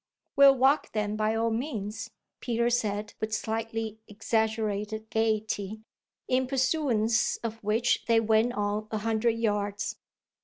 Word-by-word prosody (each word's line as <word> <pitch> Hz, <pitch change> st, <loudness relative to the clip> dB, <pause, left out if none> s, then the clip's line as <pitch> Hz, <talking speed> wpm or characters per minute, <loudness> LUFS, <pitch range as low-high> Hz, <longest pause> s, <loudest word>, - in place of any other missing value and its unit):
"We'll 275 Hz, -1 st, +8 dB
walk 270 Hz, +3 st, +2 dB
then 210 Hz, -1 st, -1 dB
by 215 Hz, +1 st, 0 dB
all 225 Hz, 0 st, +1 dB
means!" 225 Hz, -3 st, -4 dB, 0.3 s
Peter 235 Hz, 0 st, 0 dB
said 210 Hz, -3 st, -1 dB
with 220 Hz, 0 st, -1 dB
slightly 225 Hz, 0 st, -3 dB
exaggerated 220 Hz, 0 st, -2 dB
gaiety; 215 Hz, -1 st, -1 dB, 0.5 s
in 255 Hz, 0 st, +1 dB
pursuance 255 Hz, -4 st, +1 dB
of 225 Hz, -1 st, -5 dB
which 225 Hz, +3 st, +1 dB
they 230 Hz, -1 st, +5 dB
went 225 Hz, +2 st, +2 dB
on 210 Hz, 0 st, -2 dB
a 215 Hz, -, -2 dB
hundred 225 Hz, +1 st, 0 dB
yards. 205 Hz, -2 st, -1 dB
220 Hz, 125 wpm, -28 LUFS, 215-235 Hz, 0.5 s, We'll